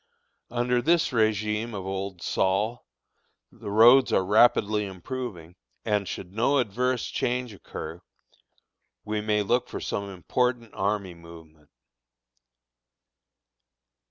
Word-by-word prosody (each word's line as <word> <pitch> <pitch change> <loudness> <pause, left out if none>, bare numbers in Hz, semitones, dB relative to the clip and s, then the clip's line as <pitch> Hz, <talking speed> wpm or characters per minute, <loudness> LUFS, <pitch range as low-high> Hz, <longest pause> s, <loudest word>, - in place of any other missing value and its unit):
Under 120 +1 0
this 165 +5 +3
régime 110 -1 0
of 95 -2 -5
old 95 -2 -5
Sol, 105 +9 0 0.6
the - - -9
roads 120 +5 +6
are 95 - +2
rapidly 105 0 +4
improving, 95 -3 -7 0.3
and 105 -3 0
should 90 +1 -7
no 120 +7 +2
adverse 125 +1 0
change 125 -2 -2
occur, 100 - -8 1.0
we 105 0 -2
may 105 0 +1
look 120 +5 0
for - - -5
some 100 0 -3
important 115 +5 -1
army 100 -2 -1
movement. 80 -3 -15
105 Hz, 105 wpm, -26 LUFS, 95-120 Hz, 1.0 s, roads